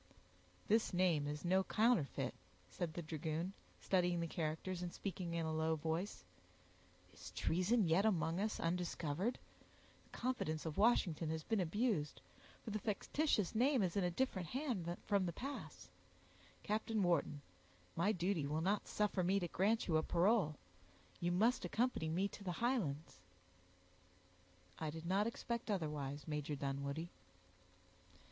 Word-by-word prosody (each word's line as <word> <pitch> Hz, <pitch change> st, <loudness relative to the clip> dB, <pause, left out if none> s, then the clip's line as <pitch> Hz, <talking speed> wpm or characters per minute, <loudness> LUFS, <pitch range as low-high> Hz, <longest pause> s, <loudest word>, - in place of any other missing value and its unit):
"This 220 Hz, -3 st, +3 dB
name 170 Hz, -5 st, +3 dB
is 150 Hz, +3 st, -4 dB
no 190 Hz, +2 st, +4 dB
counterfeit," 180 Hz, -, +2 dB, 0.4 s
said 165 Hz, -3 st, -3 dB
the 175 Hz, -, -3 dB
dragoon, 160 Hz, +3 st, -3 dB, 0.3 s
studying 180 Hz, -2 st, +2 dB
the 170 Hz, -, 0 dB
characters, 165 Hz, +3 st, -2 dB
and 175 Hz, -1 st, -3 dB
speaking 175 Hz, -3 st, -4 dB
in 165 Hz, -1 st, 0 dB
a 160 Hz, -, -1 dB
low 160 Hz, 0 st, +1 dB
voice; 160 Hz, +5 st, -2 dB, 0.9 s
"is -, -, -9 dB
treason 185 Hz, +5 st, +2 dB
yet 165 Hz, +5 st, +4 dB
among 175 Hz, -5 st, +2 dB
us 215 Hz, +2 st, -1 dB
undiscovered? 175 Hz, -, -1 dB, 0.7 s
The -, -, -26 dB
confidence 200 Hz, -12 st, -2 dB
of 160 Hz, +1 st, -3 dB
Washington 175 Hz, -8 st, +3 dB
has 160 Hz, 0 st, -2 dB
been 220 Hz, +3 st, 0 dB
abused, 185 Hz, -, 0 dB, 0.4 s
for 220 Hz, -, -5 dB
the 215 Hz, -, -1 dB
fictitious 215 Hz, -, 0 dB
name 250 Hz, +1 st, +3 dB
is 180 Hz, -3 st, -1 dB
in 200 Hz, -, +2 dB
a 180 Hz, -, +2 dB
different 190 Hz, -3 st, -1 dB
hand 210 Hz, -, -2 dB
from 200 Hz, -3 st, +2 dB
the -, -, -1 dB
pass. 240 Hz, -, -7 dB, 0.7 s
Captain 215 Hz, 0 st, 0 dB
Wharton, 165 Hz, -4 st, +1 dB, 0.5 s
my 190 Hz, +6 st, +3 dB
duty 175 Hz, -5 st, 0 dB
will 155 Hz, +2 st, 0 dB
not 195 Hz, +4 st, +1 dB
suffer 210 Hz, -2 st, +1 dB
me 190 Hz, +3 st, +3 dB
to 175 Hz, -, -2 dB
grant 210 Hz, +7 st, +1 dB
you 160 Hz, -3 st, +3 dB
a -, -, +3 dB
parole; 175 Hz, -1 st, +3 dB, 0.6 s
you 175 Hz, 0 st, 0 dB
must 220 Hz, +8 st, +3 dB
accompany 195 Hz, -3 st, 0 dB
me 185 Hz, +5 st, +1 dB
to 200 Hz, -, -10 dB
the 180 Hz, -2 st, -2 dB
Highlands." 170 Hz, -, -1 dB, 1.6 s
"I 155 Hz, -, -2 dB
did 160 Hz, +2 st, -7 dB
not 195 Hz, +5 st, +2 dB
expect 235 Hz, 0 st, -3 dB
otherwise, 150 Hz, -7 st, -2 dB
Major 150 Hz, -1 st, -2 dB
Dunwoodie." 140 Hz, +4 st, -3 dB
175 Hz, 145 wpm, -39 LUFS, 160-210 Hz, 1.6 s, no